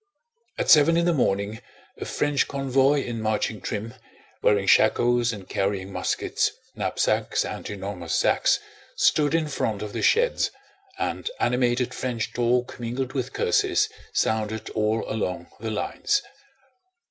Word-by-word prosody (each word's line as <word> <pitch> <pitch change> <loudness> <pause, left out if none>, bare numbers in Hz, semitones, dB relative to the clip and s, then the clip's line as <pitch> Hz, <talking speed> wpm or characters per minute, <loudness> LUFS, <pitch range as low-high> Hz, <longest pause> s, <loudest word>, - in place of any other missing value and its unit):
At - - +2
seven 160 +2 +7
in 170 - +2
the 175 - +3
morning 105 -5 0 0.4
a - - -5
French 145 -2 0
convoy 135 +1 +2
in 115 -2 -4
marching 110 0 -1
trim, 110 +2 -4 0.5
wearing 100 -1 +3
shakos 120 +4 +4
and 100 -4 -8
carrying 95 -1 -2
muskets, - - 0 0.3
knapsacks, - - 0
and - - -6
enormous 95 -4 -4
sacks, - - +3 0.4
stood 150 0 +3
in 160 -2 +1
front 110 -7 -2
of 105 - -6
the - - -3
sheds, 485 +2 +3 0.5
and 380 - -2
animated 125 0 +1
French 120 -3 -3
talk 125 +1 0
mingled 125 +2 -3
with 130 -2 -2
curses - - +2 0.2
sounded 110 0 -1
all 110 +1 0
along 90 -5 -3
the 110 +1 -4
lines. 110 - -1
120 Hz, 135 wpm, -25 LUFS, 105-135 Hz, 0.5 s, seven